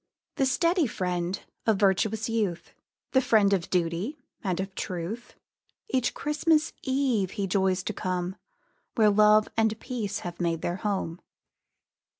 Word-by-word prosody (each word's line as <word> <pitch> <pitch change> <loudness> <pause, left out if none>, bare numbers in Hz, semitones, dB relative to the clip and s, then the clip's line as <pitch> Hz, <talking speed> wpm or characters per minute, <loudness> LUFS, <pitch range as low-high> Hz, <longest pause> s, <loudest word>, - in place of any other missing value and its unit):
The 270 - +3
steady 335 +3 +2
friend 180 -2 -2 0.3
of 220 -3 +4
virtuous 205 +2 +2
youth, 215 -7 -2 0.4
The 260 - +4
friend 210 -5 +4
of 180 -3 0
duty, 180 - -1 0.3
and 185 -3 -1
of 190 0 -3
truth, 185 +7 -5 0.5
Each 255 -2 0
Christmas 305 +1 +1
eve 260 -8 +1
he 200 - 0
joys 190 -1 +1
to 215 - -3
come 185 -1 -2 0.6
Where 215 -2 +5
love 210 +1 +5
and 220 -1 +1
peace 220 -6 -3
have 175 0 -5
made 165 -2 0
their 175 +1 -1
home. 190 -4 -2
205 Hz, 140 wpm, -27 LUFS, 185-230 Hz, 0.6 s, Where